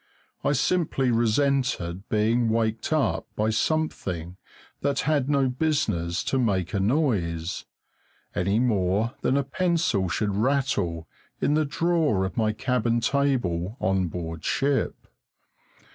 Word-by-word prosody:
I - - +2
simply 140 -3 +1
resented 115 -6 0
being 115 +2 +2
waked 110 +1 0
up 130 - +1
by 110 +1 +1
something 100 - -1 0.4
that 140 -1 0
had 145 -3 +1
no 140 -2 +3
business 125 - 0
to 135 - 0
make 95 -6 0
a 100 - +1
noise, 95 - 0 0.7
any 95 +5 +1
more 105 -1 +1
than 135 - +2
a 140 - +2
pencil 160 - 0
should 105 +3 -1
rattle 105 - 0 0.3
in 145 - +1
the 155 0 +2
drawer 155 - +1
of 95 - -5
my 110 -2 +2
cabin 120 0 0
table 120 -8 0
on 95 -1 +1
board 80 -1 -6
ship. 140 0 0
115 Hz, 125 wpm, -25 LUFS, 95-140 Hz, 0.7 s, no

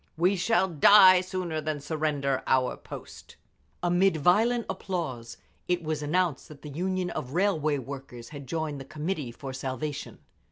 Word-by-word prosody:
"We 180 +4 +3
shall 190 +1 +2
die 185 +2 +7
sooner 180 -4 -3
than 155 -1 -3
surrender 145 -2 -1
our 130 -1 +2
post!" - - -11 0.5
Amid 175 0 +3
violent 220 +9 +3
applause 155 -12 -4 0.3
it 180 -1 0
was 155 -1 -2
announced 160 -1 0
that 150 -2 -14
the 150 - -7
Union 180 +3 -2
of 130 +2 -5
Railway 160 -6 +1
Workers 130 -3 -8
had 145 -3 -9
joined 155 -2 -3
the - - -9
Committee 150 -2 -4
for 135 +2 -8
Salvation. 135 +2 -5
155 Hz, 150 wpm, -27 LUFS, 140-180 Hz, 0.5 s, die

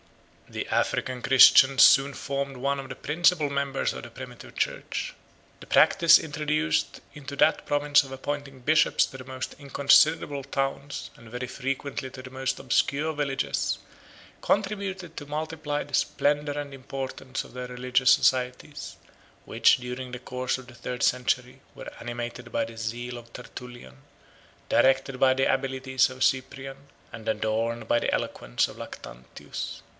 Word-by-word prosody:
The - - -5
African 130 -1 -1
Christians 135 +1 +7
soon 140 +1 +6
formed 140 -1 -4
one 140 +2 -1
of 135 -1 -8
the - - -6
principal 160 -1 +2
members 140 -1 -1
of - - -8
the - - -8
primitive - - -11
church. - - -2 0.5
The - - -10
practice 170 -1 +6
introduced 150 - -1
into 140 -1 -8
that - - +3
province 145 0 +3
of 135 - -11
appointing 140 0 -5
bishops 155 +5 +3
to 135 - -10
the 130 - -9
most 130 0 -6
inconsiderable 140 +1 +3
towns, 135 +1 -3
and 115 -1 -15
very 125 +2 -5
frequently 135 +1 -4
to 130 - -10
the 130 0 -11
most 130 0 -2
obscure 150 +3 +1
villages, 145 -2 -1 0.6
contributed 195 -4 -1
to 145 - -6
multiply 150 0 -3
the - - -16
splendor 145 0 +1
and 145 -1 -6
importance 135 0 -5
of - - -15
their 125 0 -5
religious 125 +1 +2
societies, 130 +3 +1 0.5
which - - +4
during 125 +1 -6
the 125 - -6
course 125 +1 -2
of 130 -1 -12
the 120 - -14
third 125 +1 -5
century 125 +1 0
were - - -8
animated 120 0 -6
by - - 0
the 115 - -11
zeal 120 +2 -4
of 120 -1 -13
Tertullian, 120 - -10 0.7
directed 135 0 +3
by 130 -1 +5
the 135 +1 +1
abilities 130 -1 +1
of 130 0 -3
Cyprian, 135 +1 -2 0.3
and 115 -1 -5
adorned 110 +1 -1
by 120 - +3
the - - -1
eloquence - - -1
of - - -12
Lactantius. 65 0 -8
135 Hz, 150 wpm, -26 LUFS, 125-145 Hz, 0.7 s, Christians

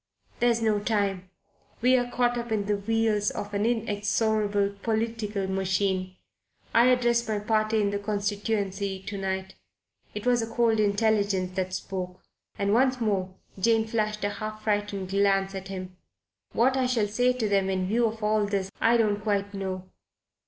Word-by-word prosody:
There's 235 -1 +2
no 215 -2 +2
time. 200 -3 -1 0.5
We're 250 0 +3
caught 245 0 +1
up 235 -1 -4
in 210 -2 0
the 205 0 +1
wheels 215 0 +1
of 205 0 -6
an 205 +2 +1
inexorable 210 -2 0
political 220 -3 -1
machine. 190 -1 -1 0.6
I 235 +2 +6
address 240 -2 +3
my 215 -1 0
party 215 +1 +1
in 200 -1 +1
the 200 - -1
constituency 200 -1 -2
to 205 +1 -6
night." 190 0 -3 0.6
It 210 - -5
was 245 -1 +3
a 225 - -4
cold 230 -2 +2
intelligence 200 -3 +1
that 185 -1 -2
spoke, 180 -1 -5 0.4
and 200 0 +1
once 255 +2 +3
more 190 -5 -1 0.2
Jane 225 +2 +3
flashed 215 -1 -1
a 205 - +1
half 215 +1 -6
frightened 205 -3 -1
glance 195 -1 +2
at 190 0 -6
him. 185 -1 -7 0.6
"What 255 +3 +3
I 260 -1 +2
shall 240 -4 +1
say 245 +5 +2
to 240 -4 -1
them, 195 -1 +2
in 185 -1 0
view 230 +5 +2
of 220 0 -6
all 210 -1 +2
this, 195 -1 -2
I 230 +1 +5
don't 210 -3 +1
quite 200 -1 -1
know. 190 -1 -4
205 Hz, 165 wpm, -27 LUFS, 195-225 Hz, 0.6 s, I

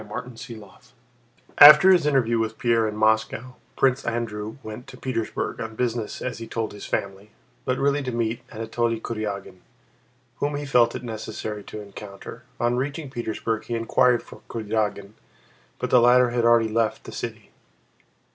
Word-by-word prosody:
CHAPTER 110 +4 -7 0.2
VIII 110 -5 -10 0.9
After 150 +6 +11
his 175 -5 +4
interview 120 -5 +2
with 110 0 -2
Pierre 115 -2 +2
in 105 - -4
Moscow, 110 +3 0 0.2
Prince 135 0 +2
Andrew 110 -2 -3
went 110 +4 -8
to 130 -2 -11
Petersburg, 125 -4 -3
on 110 -1 -6
business 115 -2 -2
as 125 -2 -4
he 115 - -7
told 115 -1 -3
his 105 - -9
family, 100 +1 -3 0.4
but 130 - 0
really 140 +1 +1
to 130 -2 -3
meet 115 0 -2
Anatole 115 +1 -1
Kurágin 100 -5 -5 0.8
whom 145 0 -1
he 145 0 -4
felt 120 -4 +3
it - - -6
necessary 110 -2 -5
to 105 - -7
encounter. 100 -1 -10 0.2
On 120 +1 +1
reaching 140 +2 -3
Petersburg 110 -2 -3
he 120 - -3
inquired 120 +1 +2
for - - -14
Kurágin 105 -2 -2 0.7
but - - -4
the 125 - +6
latter 125 0 +5
had 120 -1 +1
already 115 -1 +5
left 110 0 0
the - - -9
city. - - -7
115 Hz, 160 wpm, -24 LUFS, 110-125 Hz, 0.9 s, After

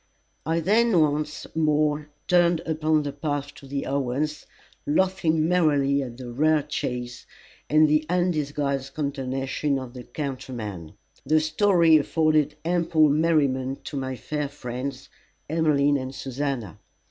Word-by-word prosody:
I 165 +1 +1
then 215 +1 +3
once 150 0 0
more 150 -1 +1 0.2
turned 175 -2 +3
upon 155 -1 +1
the 145 - -3
path 145 0 -3
to 140 - -14
the 140 +1 -3
Owens', 140 +3 -2 0.4
laughing 160 -1 +2
merrily 145 -5 +2
at 120 -3 -6
the 125 -2 -7
rare 155 +4 +2
chase, 125 -4 -4 0.4
and 155 +1 +5
the 155 +1 +2
undisguised 145 -6 -1
consternation 135 0 -2
of 130 -2 -7
the 125 -1 -8
countryman. 120 - -6 0.3
The 155 0 +3
story 165 +1 +4
afforded 155 -1 +1
ample 170 -3 +3
merriment 140 -4 +1
to - - -7
my 130 -1 -3
fair 145 +5 -3
friends 130 -1 -6 0.4
Emmeline 145 -3 +2
and 130 0 -6
Susannah. 135 - -4
145 Hz, 125 wpm, -25 LUFS, 135-155 Hz, 0.4 s, and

